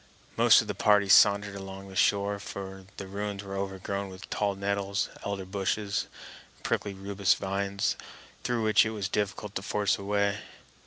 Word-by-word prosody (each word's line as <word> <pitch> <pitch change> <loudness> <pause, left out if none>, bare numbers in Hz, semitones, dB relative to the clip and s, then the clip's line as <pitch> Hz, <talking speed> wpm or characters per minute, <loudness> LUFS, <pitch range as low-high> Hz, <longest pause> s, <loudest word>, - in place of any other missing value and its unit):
Most - - +7
of - - -12
the - - -2
party 105 -1 +4
sauntered 100 +1 +6
along 95 0 -8
the 95 - -11
shore; 100 +1 +2
for 95 -1 -7
the 100 - -6
ruins 100 +1 -4
were 100 -1 -6
overgrown 100 0 -3
with 95 0 -10
tall 100 -1 0
nettles, 100 0 -1
elder 100 -2 -3
bushes, 100 +1 -1 0.5
and - - -26
prickly 100 -2 -1
rubus 100 0 +1
vines 100 0 -1 0.5
through 120 -2 0
which 110 -1 +5
it 110 - -1
was 100 -3 -1
difficult 105 +1 -2
to 95 - -3
force 100 0 0
a - - -7
way. 100 0 +1
100 Hz, 170 wpm, -28 LUFS, 95-100 Hz, 0.5 s, Most